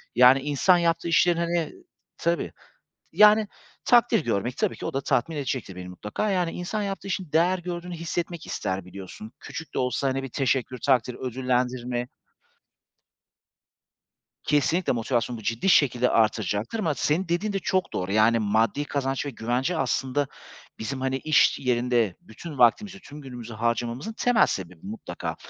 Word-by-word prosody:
Yani 125 Hz, +2 st, +7 dB
insan 150 Hz, +6 st, +3 dB
yaptığı 170 Hz, 0 st, +1 dB
işlerin, 170 Hz, 0 st, +3 dB
hani 170 Hz, -1 st, -1 dB, 0.5 s
Tabii. 170 Hz, +1 st, 0 dB, 0.6 s
T -, -, -17 dB
yani, 210 Hz, 0 st, +7 dB, 0.4 s
takdir 240 Hz, -6 st, +4 dB
görmek 115 Hz, +2 st, -1 dB
tabii -, -, 0 dB
ki -, -, -6 dB
o -, -, -3 dB
da 135 Hz, -, 0 dB
tatmin 150 Hz, +4 st, 0 dB
edecektir 130 Hz, -9 st, -3 dB
beni 90 Hz, 0 st, -7 dB
mutlaka. 105 Hz, -, -3 dB
Yani, 180 Hz, -3 st, +1 dB
insan 205 Hz, +4 st, -3 dB
yaptığı 195 Hz, 0 st, -4 dB
işin 185 Hz, -5 st, -4 dB
değer 175 Hz, +3 st, +3 dB
gördüğünü 175 Hz, 0 st, -5 dB
hissetmek 170 Hz, 0 st, -4 dB
ister, 95 Hz, -1 st, -3 dB
biliyorsun. 95 Hz, +4 st, -10 dB
Küçük 160 Hz, -, -8 dB
de -, -, -1 dB
olsa 130 Hz, +2 st, 0 dB
hani 135 Hz, +1 st, -1 dB
bir 135 Hz, -, -5 dB
teşekkür, 130 Hz, 0 st, -1 dB
takdir, 125 Hz, -2 st, +1 dB
ödüllendirme. 125 Hz, -1 st, -2 dB, 2.4 s
Kesinlikle 150 Hz, +3 st, +1 dB
motivasyonumu 120 Hz, 0 st, -1 dB
bu -, -, -12 dB
ciddi 115 Hz, -, 0 dB
şekilde 125 Hz, -6 st, +4 dB
artıracaktır. 110 Hz, -, 0 dB
Ama 165 Hz, -7 st, +1 dB
senin 170 Hz, +5 st, 0 dB
dediğin 190 Hz, +5 st, -1 dB
de 195 Hz, -, 0 dB
çok 185 Hz, 0 st, -1 dB
doğru. 95 Hz, +1 st, -2 dB
Yani 110 Hz, +2 st, +4 dB
maddi 110 Hz, +6 st, +1 dB
kazanç 135 Hz, -1 st, -2 dB
ve -, -, -2 dB
güvence 125 Hz, +8 st, -1 dB
aslında 135 Hz, 0 st, 0 dB, 0.5 s
bizim, 130 Hz, +4 st, -4 dB
hani, 130 Hz, 0 st, 0 dB
iş 155 Hz, +3 st, +3 dB
yerinde 120 Hz, -5 st, +1 dB
bütün 145 Hz, +7 st, -10 dB
vaktimizi, 190 Hz, -, +3 dB
tüm 150 Hz, -3 st, -11 dB
günümüzü 120 Hz, -4 st, -8 dB
harcamamızın 120 Hz, -, -2 dB
temel 245 Hz, 0 st, +3 dB
sebebi 90 Hz, -3 st, -5 dB
mutlaka. 105 Hz, +3 st, -6 dB
135 Hz, 155 wpm, -25 LUFS, 115-170 Hz, 2.4 s, Yani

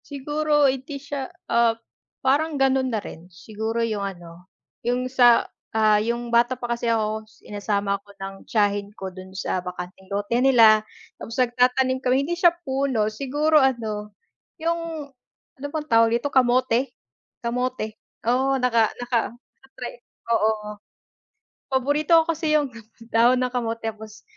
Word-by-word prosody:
Siguro 295 Hz, +1 st, +1 dB
hindi 270 Hz, +1 st, -1 dB
siya 280 Hz, -1 st, -5 dB, 0.2 s
ah, 230 Hz, -1 st, +3 dB, 0.5 s
parang 295 Hz, +3 st, +2 dB
ganun 265 Hz, -1 st, +2 dB
na 225 Hz, -, -1 dB
rin 175 Hz, -3 st, -10 dB
siguro 220 Hz, +5 st, -3 dB
'yung 215 Hz, -3 st, -2 dB
ano, 175 Hz, -2 st, -8 dB, 0.3 s
'yung 245 Hz, +1 st, -1 dB
sa 245 Hz, -2 st, +5 dB, 0.3 s
ah, 215 Hz, -1 st, +4 dB
'yung 235 Hz, +1 st, -3 dB
bata 240 Hz, +2 st, +3 dB
pa 240 Hz, -1 st, -2 dB
kasi 235 Hz, 0 st, -2 dB
ako 220 Hz, -1 st, 0 dB
sinasama 200 Hz, -2 st, -3 dB
ako 200 Hz, -, -26 dB
ng 195 Hz, 0 st, -6 dB
tiyahin 205 Hz, -2 st, +1 dB
ko 190 Hz, -1 st, -6 dB
dun 185 Hz, 0 st, -10 dB
sa 185 Hz, -1 st, -2 dB
bakanteng 180 Hz, +1 st, -8 dB
lote 205 Hz, +3 st, -2 dB
nila 230 Hz, -5 st, +6 dB, 0.4 s
tapos 230 Hz, -, -7 dB
nagtatanim 255 Hz, +1 st, +2 dB
kami 260 Hz, +2 st, +2 dB
hindi 345 Hz, -, -1 dB
siya 345 Hz, 0 st, +6 dB, 0.2 s
puno 265 Hz, -5 st, 0 dB
siguro 290 Hz, +6 st, 0 dB
ano, 220 Hz, -5 st, -1 dB, 0.5 s
yung 330 Hz, -2 st, -3 dB, 0.5 s
ano 285 Hz, -, -3 dB
bang 310 Hz, -1 st, -3 dB
tawag 230 Hz, -2 st, +4 dB
dito 240 Hz, -, -3 dB
kamote 255 Hz, 0 st, +3 dB, 0.6 s
kamote 245 Hz, -2 st, -2 dB, 0.3 s
oo, 265 Hz, +3 st, +2 dB
naka 235 Hz, -3 st, +3 dB, 0.2 s
naka 240 Hz, -1 st, +2 dB, 0.2 s
naka-try 250 Hz, -1 st, -11 dB, 0.3 s
ako 235 Hz, -, +1 dB
oo. 215 Hz, -1 st, 0 dB, 1.0 s
Paborito 285 Hz, +4 st, 0 dB
ko -, -, -7 dB
kasi 315 Hz, -1 st, 0 dB
'yung 295 Hz, -3 st, +2 dB, 0.4 s
dahon 240 Hz, +3 st, +4 dB
ng 250 Hz, -, 0 dB
kamote 230 Hz, -2 st, -3 dB
tapos, 215 Hz, 0 st, -12 dB
240 Hz, 145 wpm, -24 LUFS, 215-265 Hz, 1.0 s, nila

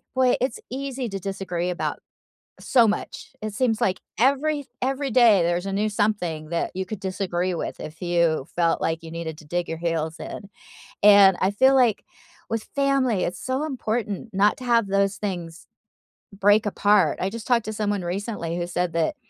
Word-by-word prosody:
boy, 255 Hz, -1 st, +4 dB
it's 255 Hz, -2 st, -1 dB
easy 265 Hz, -1 st, -4 dB
to 195 Hz, -, -4 dB
disagree 185 Hz, -2 st, -3 dB
about 180 Hz, -, -3 dB, 0.6 s
so 235 Hz, -4 st, +4 dB
much. 210 Hz, -, -4 dB
It 215 Hz, -1 st, -4 dB
seems 225 Hz, -2 st, 0 dB
like 185 Hz, -1 st, +1 dB, 0.2 s
every 280 Hz, +4 st, +2 dB, 0.2 s
every 270 Hz, +1 st, -1 dB
day 220 Hz, -6 st, +6 dB
there's 175 Hz, +2 st, 0 dB
a 195 Hz, -, -3 dB
new 210 Hz, +2 st, +1 dB
something 190 Hz, -7 st, -1 dB
that 170 Hz, 0 st, -1 dB
you 190 Hz, +1 st, -3 dB
could 210 Hz, +1 st, -6 dB
disagree 185 Hz, -2 st, -2 dB
with 170 Hz, -, -4 dB
if 155 Hz, +1 st, -9 dB
you 170 Hz, -5 st, +1 dB
felt 170 Hz, -1 st, +2 dB
like 165 Hz, 0 st, -1 dB
you 160 Hz, -, -9 dB
needed 160 Hz, -2 st, -5 dB
to 155 Hz, -, -14 dB
dig 175 Hz, +3 st, -2 dB
your 165 Hz, -, -3 dB
heels 165 Hz, -1 st, -2 dB
in, 200 Hz, -, -8 dB, 0.5 s
and 200 Hz, -2 st, +8 dB
I 190 Hz, -, +2 dB
feel 265 Hz, +6 st, +4 dB
like 245 Hz, -5 st, +3 dB, 0.5 s
with 225 Hz, -1 st, -2 dB
family, 270 Hz, -7 st, +2 dB
it's 180 Hz, +1 st, -5 dB
so 260 Hz, +3 st, -1 dB
important 230 Hz, -6 st, -3 dB
not 205 Hz, +2 st, +3 dB
to 255 Hz, -, -8 dB
have 235 Hz, -3 st, +3 dB
those 200 Hz, 0 st, +1 dB
things 175 Hz, -5 st, -5 dB, 0.7 s
break 205 Hz, +2 st, +3 dB
apart. 200 Hz, -5 st, +3 dB
I 190 Hz, -, 0 dB
just 230 Hz, -1 st, -7 dB
talked 240 Hz, -3 st, +2 dB
to 215 Hz, -, -4 dB
someone 205 Hz, -2 st, -1 dB
recently 175 Hz, -2 st, -3 dB
who 175 Hz, 0 st, -2 dB
said 175 Hz, -1 st, -2 dB
that 165 Hz, -, 0 dB
200 Hz, 185 wpm, -24 LUFS, 175-230 Hz, 0.7 s, and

